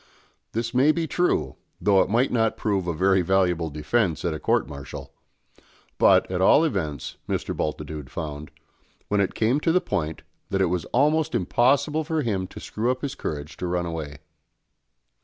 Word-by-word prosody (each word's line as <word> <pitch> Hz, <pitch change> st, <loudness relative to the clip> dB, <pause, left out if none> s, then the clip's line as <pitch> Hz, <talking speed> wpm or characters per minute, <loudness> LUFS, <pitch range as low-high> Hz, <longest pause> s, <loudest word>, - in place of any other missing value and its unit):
This 115 Hz, +1 st, -2 dB
may 135 Hz, +5 st, +5 dB
be 165 Hz, +1 st, -1 dB
true, 175 Hz, +3 st, 0 dB, 0.2 s
though 100 Hz, -2 st, +4 dB
it -, -, 0 dB
might 120 Hz, +5 st, +2 dB
not 115 Hz, -2 st, +1 dB
prove 100 Hz, -4 st, -1 dB
a -, -, +1 dB
very 95 Hz, +3 st, +3 dB
valuable 90 Hz, -2 st, +1 dB
defence 80 Hz, +5 st, 0 dB
at 85 Hz, -, 0 dB
a 80 Hz, -, -5 dB
court -, -, +1 dB
martial; 70 Hz, -2 st, -9 dB, 0.9 s
but, -, -, +5 dB
at 90 Hz, 0 st, -1 dB
all 140 Hz, +11 st, +6 dB
events, 80 Hz, -, -3 dB
Mr. -, -, -2 dB
Bultitude 75 Hz, -2 st, -4 dB
found, 75 Hz, 0 st, -6 dB, 0.6 s
when 105 Hz, -1 st, +2 dB
it 95 Hz, -, -1 dB
came 115 Hz, +6 st, +2 dB
to 165 Hz, -, +1 dB
the 180 Hz, -, +4 dB
point, 80 Hz, -, -3 dB, 0.3 s
that 95 Hz, 0 st, 0 dB
it 95 Hz, -3 st, +2 dB
was 90 Hz, -3 st, -2 dB
almost 150 Hz, +2 st, +2 dB
impossible 140 Hz, -, +2 dB
for 160 Hz, -1 st, -1 dB
him 95 Hz, -6 st, -1 dB
to -, -, -10 dB
screw 115 Hz, +3 st, -2 dB
up 130 Hz, +2 st, -1 dB
his 140 Hz, -, -2 dB
courage 75 Hz, 0 st, -5 dB
to 90 Hz, -, -3 dB
run 90 Hz, 0 st, -1 dB
away. 80 Hz, -4 st, -5 dB
95 Hz, 175 wpm, -25 LUFS, 80-125 Hz, 0.9 s, all